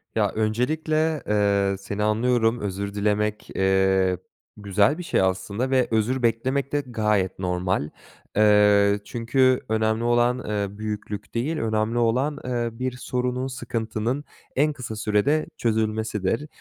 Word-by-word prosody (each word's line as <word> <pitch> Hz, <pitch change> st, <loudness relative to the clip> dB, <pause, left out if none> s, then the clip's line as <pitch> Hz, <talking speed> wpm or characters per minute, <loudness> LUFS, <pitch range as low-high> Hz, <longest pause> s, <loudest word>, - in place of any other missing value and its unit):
Ya, 105 Hz, -3 st, +2 dB
öncelikle, 155 Hz, +8 st, 0 dB
eee, 100 Hz, -1 st, +2 dB
seni 100 Hz, +1 st, -4 dB
anlıyorum. 115 Hz, +2 st, +2 dB
Özür 100 Hz, 0 st, -4 dB
dilemek, 105 Hz, +1 st, -1 dB
eee, 95 Hz, -1 st, +2 dB, 0.4 s
güzel 100 Hz, +6 st, +2 dB
bir 180 Hz, -, -5 dB
şey 165 Hz, -, +1 dB
aslında 95 Hz, +6 st, -1 dB
ve 130 Hz, -2 st, +2 dB
özür 120 Hz, +3 st, +1 dB
beklemek 130 Hz, +4 st, 0 dB
de 145 Hz, -, +1 dB
gayet 105 Hz, -6 st, 0 dB
normal. 90 Hz, -4 st, -1 dB, 0.5 s
Eee, 105 Hz, -1 st, +5 dB
çünkü 130 Hz, +4 st, +2 dB
önemli 110 Hz, +1 st, +1 dB
olan, 120 Hz, +1 st, +2 dB
eee, 100 Hz, -1 st, -2 dB
büyüklük 105 Hz, -1 st, -5 dB
değil, 145 Hz, +8 st, -1 dB
önemli 110 Hz, 0 st, 0 dB
olan, 125 Hz, +6 st, +1 dB
eee, 120 Hz, -2 st, -1 dB
bir 130 Hz, +3 st, -3 dB
sorunun, 125 Hz, 0 st, -2 dB
sıkıntının 120 Hz, +1 st, -3 dB, 0.3 s
en 150 Hz, +2 st, +2 dB
kısa 120 Hz, -5 st, -6 dB
sürede 110 Hz, +9 st, +1 dB
çözülmesidir. 110 Hz, +1 st, -1 dB
110 Hz, 125 wpm, -24 LUFS, 105-125 Hz, 0.5 s, Eee